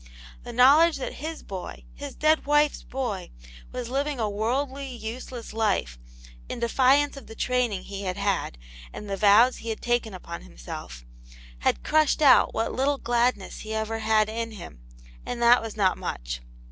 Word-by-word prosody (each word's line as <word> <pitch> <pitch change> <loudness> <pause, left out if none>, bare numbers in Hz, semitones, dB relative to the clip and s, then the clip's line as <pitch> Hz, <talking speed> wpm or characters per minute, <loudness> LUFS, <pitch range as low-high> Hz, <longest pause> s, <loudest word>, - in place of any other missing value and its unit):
The - - -8
know 255 +4 +7
ledge 335 0 +4
that 270 - -6
his 320 +1 -5
boy, 190 -2 -7
his 285 -2 -8
dead 310 -1 +2
wife's 295 0 +3
boy, 245 -8 -4 0.4
was 250 -2 -5
living 280 +2 -2
a 220 - +1
worldly, 260 +7 -2
useless 240 -1 -7
life, 200 - 0 0.5
in - - -4
defiance 270 +5 +3
of 275 - -11
the 225 - -10
training 240 -6 0
he 200 0 -7
had 185 -1 -3
had, 200 - -1 0.3
and 210 - -8
the 200 - -2
vows 215 +5 +5
he 230 - -7
had 220 - -3
taken 240 -4 0
upon 170 -2 -8
himself, - - -9 0.5
had - - 0
crushed 310 0 +2
out 265 -3 +6
what 225 - -2
little 275 +2 +1
gladness 240 -5 0
he 220 0 -5
ever 220 +1 -2
had 220 -1 +3
in 230 +1 -4
him, 170 - -10 0.4
and 245 - -5
that 235 +1 +6
was 225 -1 -7
not 190 -3 +2
much. - - -5
230 Hz, 170 wpm, -26 LUFS, 205-265 Hz, 0.5 s, know